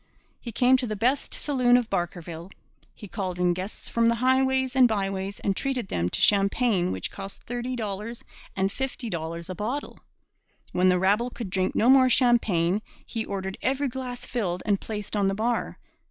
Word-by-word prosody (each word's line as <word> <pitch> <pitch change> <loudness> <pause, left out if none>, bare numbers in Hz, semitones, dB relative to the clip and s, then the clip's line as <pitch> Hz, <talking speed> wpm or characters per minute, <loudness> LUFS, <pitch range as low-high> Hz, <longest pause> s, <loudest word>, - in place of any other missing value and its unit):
He 235 - -7
came 255 +3 +4
to 255 -1 -3
the 215 - -3
best 250 +7 0
saloon 250 -4 +3
of 245 -2 0
Barkerville. 175 -2 -3 0.5
He 205 - -10
called 185 -1 -4
in 180 -1 +2
guests 185 +4 -6
from 230 0 +2
the 235 - +3
highways 260 +1 +2
and 255 -2 +7
byways 195 -2 -2
and 195 - 0
treated 255 -6 -2
them 85 +1 0
to - - -1
champagne 200 -1 +3
which 95 -1 -3
cost 195 0 -8
thirty 245 +1 -3
dollars 215 +1 -4 0.3
and 195 +1 +1
fifty 260 -1 -4
dollars 170 0 -4
a 185 - -4
bottle. 235 +10 -4 0.7
When 185 +1 +3
the 180 - +4
rabble 205 +6 +2
could 230 -6 -7
drink 185 -1 0
no 230 - +3
more 260 0 +7
champagne, 215 -8 +3 0.2
he 225 -2 -3
ordered 190 -2 -5
every 275 +1 0
glass 250 -1 -6
filled 185 -8 -2
and 200 -2 +1
placed 210 -1 -5
on 200 -2 +2
the 195 - 0
bar. 230 +3 -1
215 Hz, 185 wpm, -26 LUFS, 190-245 Hz, 0.7 s, and